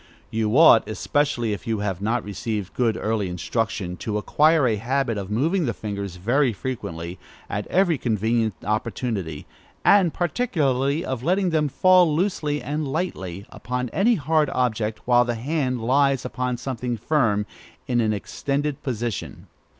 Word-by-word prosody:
You 110 Hz, +2 st, +1 dB
ought, 150 Hz, -10 st, +7 dB
especially 120 Hz, -1 st, 0 dB
if 100 Hz, -, -7 dB
you 110 Hz, -1 st, 0 dB
have 95 Hz, -3 st, -2 dB
not 115 Hz, +3 st, 0 dB
received 105 Hz, -1 st, -4 dB
good 115 Hz, -3 st, +1 dB
early 110 Hz, -3 st, -1 dB
instruction, 90 Hz, 0 st, -2 dB
to 105 Hz, +2 st, -3 dB
acquire 150 Hz, +7 st, +3 dB
a 110 Hz, -3 st, +1 dB
habit 125 Hz, +2 st, 0 dB
of 100 Hz, -2 st, -5 dB
moving 155 Hz, -, +1 dB
the 115 Hz, -, -2 dB
fingers 100 Hz, -3 st, -5 dB
very 120 Hz, +7 st, +1 dB
frequently, 90 Hz, -8 st, -5 dB, 0.3 s
at 100 Hz, +1 st, -4 dB
every 175 Hz, -6 st, +2 dB
convenient 110 Hz, -1 st, 0 dB
opportunity; 105 Hz, -, -3 dB, 0.4 s
and 195 Hz, -5 st, +5 dB
particularly 155 Hz, -, 0 dB
of 130 Hz, -3 st, -3 dB
letting 180 Hz, +5 st, +1 dB
them 155 Hz, -2 st, +2 dB
fall 180 Hz, 0 st, +4 dB
loosely 155 Hz, -5 st, -1 dB
and 150 Hz, +1 st, -2 dB
lightly 100 Hz, -, -3 dB
upon 125 Hz, +2 st, -4 dB
any 230 Hz, -, +3 dB
hard 155 Hz, -2 st, +1 dB
object, 110 Hz, -3 st, -1 dB
while 120 Hz, 0 st, +5 dB
the 120 Hz, -1 st, -2 dB
hand 130 Hz, 0 st, -1 dB
lies 135 Hz, +1 st, +2 dB
upon 125 Hz, -1 st, -2 dB
something 125 Hz, -1 st, -3 dB
firm, 110 Hz, -4 st, +1 dB, 0.4 s
in 120 Hz, -1 st, +2 dB
an 110 Hz, -1 st, +1 dB
extended 140 Hz, +7 st, -2 dB
position. 120 Hz, -5 st, -4 dB
125 Hz, 150 wpm, -23 LUFS, 105-150 Hz, 0.4 s, ought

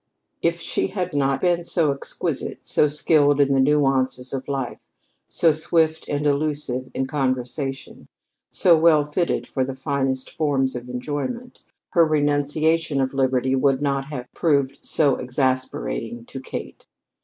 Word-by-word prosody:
If 170 Hz, 0 st, +1 dB
she -, -, -1 dB
had 185 Hz, -3 st, -3 dB
not 135 Hz, -1 st, +1 dB
been 175 Hz, -1 st, +2 dB
so 160 Hz, -4 st, +1 dB
exquisite, 140 Hz, -, -4 dB
so 150 Hz, -, +3 dB
skilled 145 Hz, -1 st, +3 dB
in 140 Hz, -1 st, +4 dB
the 135 Hz, -, +3 dB
nuances 135 Hz, -2 st, +1 dB
of 135 Hz, -1 st, -4 dB
life, 135 Hz, -3 st, -3 dB, 0.5 s
so 165 Hz, -, +3 dB
swift 160 Hz, +1 st, +1 dB
and 145 Hz, 0 st, -1 dB
elusive 145 Hz, -3 st, -1 dB
in 135 Hz, -, 0 dB
conversation, 135 Hz, 0 st, -3 dB, 0.4 s
so 175 Hz, -2 st, +5 dB
well 155 Hz, -2 st, +4 dB
fitted 170 Hz, +4 st, -1 dB
for 130 Hz, -, -2 dB
the 130 Hz, 0 st, -4 dB
finest 135 Hz, -1 st, -2 dB
forms 135 Hz, -5 st, 0 dB
of 125 Hz, 0 st, -7 dB
enjoyment, 150 Hz, -, -4 dB, 0.3 s
her 170 Hz, -, +5 dB
renunciation 155 Hz, 0 st, +1 dB
of 130 Hz, 0 st, 0 dB
liberty 130 Hz, -1 st, +1 dB
would 135 Hz, 0 st, +2 dB
not 140 Hz, -1 st, -1 dB
have 140 Hz, -4 st, -6 dB
proved 140 Hz, -4 st, 0 dB
so 145 Hz, -4 st, +2 dB
exasperating 130 Hz, -2 st, -2 dB
to 135 Hz, -, -8 dB
Kate. 130 Hz, -, -8 dB
140 Hz, 145 wpm, -23 LUFS, 130-155 Hz, 0.5 s, so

